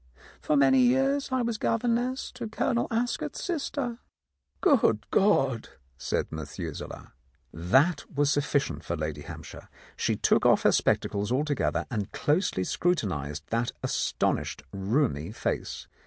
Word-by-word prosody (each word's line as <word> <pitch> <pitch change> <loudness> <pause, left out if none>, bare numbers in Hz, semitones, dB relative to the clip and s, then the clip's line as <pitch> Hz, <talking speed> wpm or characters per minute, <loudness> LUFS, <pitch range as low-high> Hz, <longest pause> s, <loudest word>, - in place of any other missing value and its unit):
For 150 - +1
many 140 - +5
years 270 +3 +2
I 260 -1 +1
was 230 -2 -2
governess 245 +3 0
to 245 -2 -6
Colonel 235 +2 0
Ascot's 240 +2 -2
sister. 280 -8 -2 0.6
"Good 225 - +3
God!" 135 - +2 0.3
said 65 - -2
Methuselah. - - -7 0.4
That 130 - +2
was 145 0 +2
sufficient 140 - 0
for 85 - -2
Lady 75 -2 -4
Hampshire. - - -10 0.3
She - - 0
took - - +2
off - - +4
her - - +5
spectacles 105 +2 +1
altogether 145 +2 0
and 105 -4 -3
closely 150 - +1
scrutinized 85 - -1
that 115 +1 0
astonished - - -1
rheumy 100 - 0
face. - - -3
145 Hz, 125 wpm, -28 LUFS, -, 0.6 s, many